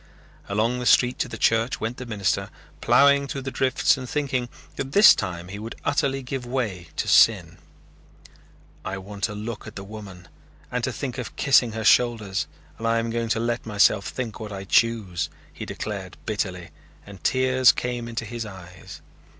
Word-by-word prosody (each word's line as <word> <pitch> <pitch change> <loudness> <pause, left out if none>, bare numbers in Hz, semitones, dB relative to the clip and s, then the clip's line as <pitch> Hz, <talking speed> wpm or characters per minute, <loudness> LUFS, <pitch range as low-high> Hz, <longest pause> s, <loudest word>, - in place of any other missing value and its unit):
Along 110 +5 0
the 125 - -2
street 125 +3 +4
to - - 0
the - - -7
church 115 +2 +1
went 115 +3 -3
the 125 - -7
minister, 105 -4 -1 0.3
plowing 140 +3 +5
through 135 -1 -5
the 135 - -4
drifts 130 +1 +2
and 130 -2 -7
thinking 130 -4 -1 0.3
that 135 0 -5
this 205 +1 +9
time 90 -2 -5
he 100 +2 -7
would 110 +2 -7
utterly 135 -1 0
give 130 0 -4
way 115 -9 -3
to - - -2
sin. - - +4 1.2
"I 95 - -4
want 100 +1 -9
to 105 - -5
look 110 +1 -6
at 110 - -10
the 100 - -6
woman 100 -4 -10 0.4
and 125 -1 -2
to 130 - -2
think 130 0 -5
of 120 - -6
kissing 125 -5 +3
her 110 0 -4
shoulders 115 -6 +3 0.3
and 115 - -2
I 115 0 +2
am 115 0 -1
going 115 0 -2
to 110 - +1
let 115 0 -2
myself 105 -1 +3
think 120 -4 -5
what 110 -1 -7
I 95 -1 -6
choose," 100 -4 +1 0.2
he - - -7
declared 100 -4 -6
bitterly 95 -5 -3 0.3
and 100 -2 -13
tears 130 -1 +4
came 120 -1 -4
into 115 0 -4
his 115 +1 -5
eyes. 95 -3 -11
115 Hz, 185 wpm, -24 LUFS, 100-125 Hz, 1.2 s, this